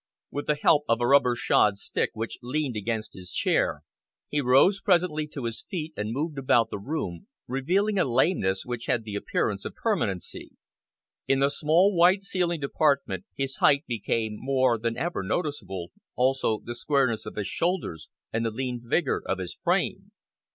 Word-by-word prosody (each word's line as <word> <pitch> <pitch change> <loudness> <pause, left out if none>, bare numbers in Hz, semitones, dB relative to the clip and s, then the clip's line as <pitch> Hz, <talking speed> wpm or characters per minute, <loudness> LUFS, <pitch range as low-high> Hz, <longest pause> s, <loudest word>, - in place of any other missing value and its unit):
With 145 - -4
the 150 - +3
help 150 0 +5
of 115 0 +3
a 120 - +1
rubber 125 -2 +4
shod 105 -3 +3
stick - - -1
which 115 +1 -5
leaned 130 0 -2
against 110 0 -3
his 90 -1 -10
chair, - - +1 0.5
he 145 - 0
rose 135 +10 +4
presently 170 -6 +2
to 145 -3 -7
his 115 -1 -4
feet 160 -3 -4
and 105 +1 -3
moved 145 +3 -2
about 120 -4 +3
the - - -4
room, 130 - -4 0.2
revealing 185 - +1
a - - +5
lameness 120 - +1
which 120 -1 -5
had 120 -5 +1
the 105 -2 -7
appearance 100 - -1
of - - -6
permanency. 95 -3 -2 0.7
In 135 - +3
the 140 +1 +4
small, 175 +8 +3
white 180 +3 +5
ceilinged 175 -5 -1
apartment 140 - +1
his 135 -1 -3
height 140 +2 +4
became 110 -2 -2
more 130 -3 +2
than 115 +1 -2
ever 175 - -2
noticeable, 95 - -3 0.2
also 130 -4 +1
the 120 - -5
squareness 125 -4 0
of - - -7
his 105 - -2
shoulders 135 - -2 0.2
and 115 +1 0
the 115 - +1
lean 125 +1 -4
vigour 135 +5 0
of 95 - 0
his 90 -2 -5
frame. - - -1
130 Hz, 170 wpm, -27 LUFS, 110-155 Hz, 0.7 s, help